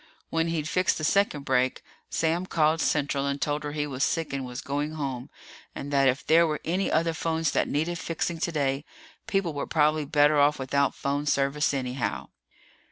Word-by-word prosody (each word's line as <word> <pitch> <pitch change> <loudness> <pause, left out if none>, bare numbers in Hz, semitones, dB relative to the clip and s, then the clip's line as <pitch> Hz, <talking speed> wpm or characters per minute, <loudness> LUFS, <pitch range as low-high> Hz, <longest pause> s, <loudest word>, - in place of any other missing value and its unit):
When 165 0 +1
he'd 160 -2 -2
fixed 185 +3 +1
the 155 - -5
second 155 -4 +1
break, 130 0 +1 0.3
Sam 165 +3 0
called 155 -1 +2
Central 140 -2 0
and 140 0 -2
told 150 +1 -1
her 145 - -3
he 150 -1 -1
was 135 -1 -2
sick 165 -4 -1
and 135 -1 -2
was 125 0 -6
going 145 +3 -3
home, 135 -3 -4 0.5
and 145 +1 -6
that 135 -1 +4
if 130 +2 0
there 165 +1 +5
were 150 -1 -2
any 185 +4 0
other 165 +1 +2
phones 160 -1 -1
that - - +1
needed 165 +3 -1
fixing 165 0 -3
today, 145 -4 0 0.4
people 195 -5 0
were 145 - -3
probably 155 -1 +2
better 145 +1 +4
off 145 +1 +4
without 140 +1 0
phone 145 +1 -2
service, 140 +1 +1
anyhow. 130 -2 -3
150 Hz, 185 wpm, -27 LUFS, 140-160 Hz, 0.5 s, there